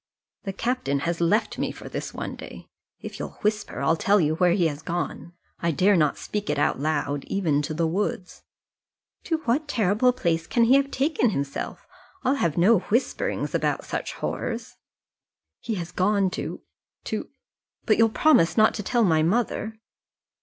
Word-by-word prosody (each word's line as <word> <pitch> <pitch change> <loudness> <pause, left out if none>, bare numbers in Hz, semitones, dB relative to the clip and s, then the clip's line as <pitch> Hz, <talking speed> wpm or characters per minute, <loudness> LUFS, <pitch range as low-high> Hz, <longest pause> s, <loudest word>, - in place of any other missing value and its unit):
"The 195 - -3
captain 215 - -1
has 170 +2 -2
left 205 +7 +1
me - - -1
for - - -10
this - - -5
one - - -5
day. - - -11 0.3
If - - -8
you'll - - -6
whisper 210 -5 -1
I'll 140 +4 +3
tell 200 +5 +3
you 155 -3 +2
where 175 +1 +3
he 180 -2 +2
has 150 -2 -2
gone. 175 0 -4 0.3
I 170 - 0
dare 190 +6 +3
not 150 -4 +2
speak 210 -1 -4
it - - 0
out 145 - +1
loud, 145 -1 -1
even 160 -7 0
to 155 +2 -4
the 165 +1 +1
woods." 185 +1 -2 0.8
"To 320 -2 -1
what 275 +6 +1
terrible 220 0 +2
place 170 -10 -1
can 235 - +2
he 235 +3 +5
have 275 0 +4
taken 275 -3 +1
himself? 140 -7 -4 0.4
I'll 260 - +3
have 170 - 0
no 195 +5 +5
whisperings 225 +8 -1
about - - 0
such - - -4
horrors." - - -4 0.8
"He 225 - -3
has 175 -2 -5
gone 195 0 +2
to - - -5 0.4
to - - -4 0.6
but 215 - +3
you'll 225 0 +6
promise 220 - +3
not 215 0 +5
to 210 - -4
tell 235 +4 +1
my 160 -6 +3
mother?" 220 +4 0
195 Hz, 175 wpm, -25 LUFS, 165-230 Hz, 0.8 s, you'll